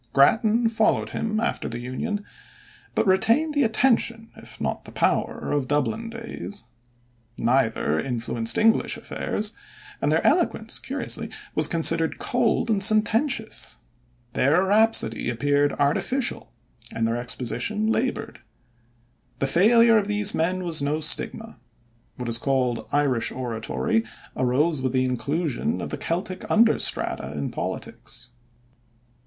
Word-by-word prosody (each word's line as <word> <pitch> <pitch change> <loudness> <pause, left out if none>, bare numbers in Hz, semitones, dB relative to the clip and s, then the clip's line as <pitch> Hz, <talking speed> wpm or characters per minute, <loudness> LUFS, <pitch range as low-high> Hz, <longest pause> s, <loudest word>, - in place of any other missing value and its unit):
Grattan 220 - +4
followed 220 -1 +1
him 215 -1 -2
after 235 +1 -2
the 120 - -3
Union, 130 - -4 0.7
but - - +2
retained 230 +11 +3
the 290 - +2
attention 230 -1 +1
if - - -12
not - - -3
the - - -9
power - - 0
of 145 -3 0
Dublin 220 - -1
days. 230 -3 -7 0.7
Neither 115 - +1
influenced 115 -2 -1
English 225 +1 +3
affairs, 210 +1 -3 0.5
and - - +1
their - - +1
eloquence - - +2
curiously - - -3 0.2
was - - +2
considered 165 0 +2
cold 245 -2 +1
and 205 -2 +1
sententious. 220 +4 +1 0.6
Their 150 +8 +3
rhapsody 205 - +3
appeared 145 +4 +1
artificial, 200 - 0 0.4
and 115 0 -1
their 115 +1 -1
exposition 125 - -2
labored. 250 +3 -2 1.0
The - - 0
failure 225 - +5
of 200 - -3
these 210 0 +1
men 185 +3 0
was 165 -4 0
no 145 +2 0
stigma. 155 - 0 0.6
What 125 -1 -6
is 115 0 0
called 125 -3 0
"Irish 140 -5 +1
oratory" 130 - -1 0.3
arose 130 +4 +1
with 130 -1 -1
the 130 0 +2
inclusion 150 - -1
of - - -5
the - - -3
Celtic 185 +2 -3
under 225 +1 +4
strata 65 - -1
in 70 - -3
politics. 120 - -6
170 Hz, 125 wpm, -24 LUFS, -, 1.0 s, failure